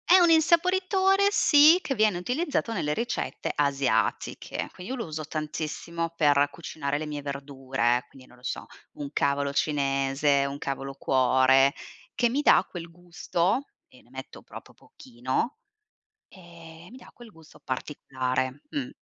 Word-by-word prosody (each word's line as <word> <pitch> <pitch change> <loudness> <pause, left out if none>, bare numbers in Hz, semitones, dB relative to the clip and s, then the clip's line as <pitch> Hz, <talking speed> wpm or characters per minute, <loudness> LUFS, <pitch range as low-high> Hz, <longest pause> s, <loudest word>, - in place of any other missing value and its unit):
È 365 - +8
un 345 -1 +5
insaporitore 375 +4 +3
sì, 310 -2 +6
che 270 - -3
viene 215 -4 +2
utilizzato 250 - -2
nelle 155 -7 -1
ricette 235 +7 -3
asiatiche. 135 -6 -1
Quindi 185 +7 -9
io 265 - -3
lo 230 - -4
uso 155 -1 -5
tantissimo, 155 +2 -4
per 145 -2 +3
cucinare 145 -3 -4
le 155 - -4
mie 150 -1 -5
verdure, 135 -3 -2
quindi 130 -1 -17
non - - -18
lo 125 - -23
so, - - -4 0.3
un 145 -1 -7
cavolo 140 0 0
cinese, 140 -1 +1
un 140 0 -4
cavolo 135 -1 -5
cuore, 135 +1 +3 0.4
che 240 - +1
mi 270 +5 0
dà - - +5
quel 170 -2 -8
gusto 175 +7 -2 0.2
e 125 - -20
ne - - -26
metto 130 +1 -10
proprio - - -12
pochino, 130 - -4 0.7
ehm, 170 -1 -14
mi 250 - -12
dà - - -15
quel 240 -2 -14
gusto 160 -4 -18
particolare. 130 -1 -3
Mh. 275 -3 -3
150 Hz, 150 wpm, -26 LUFS, 135-230 Hz, 0.7 s, È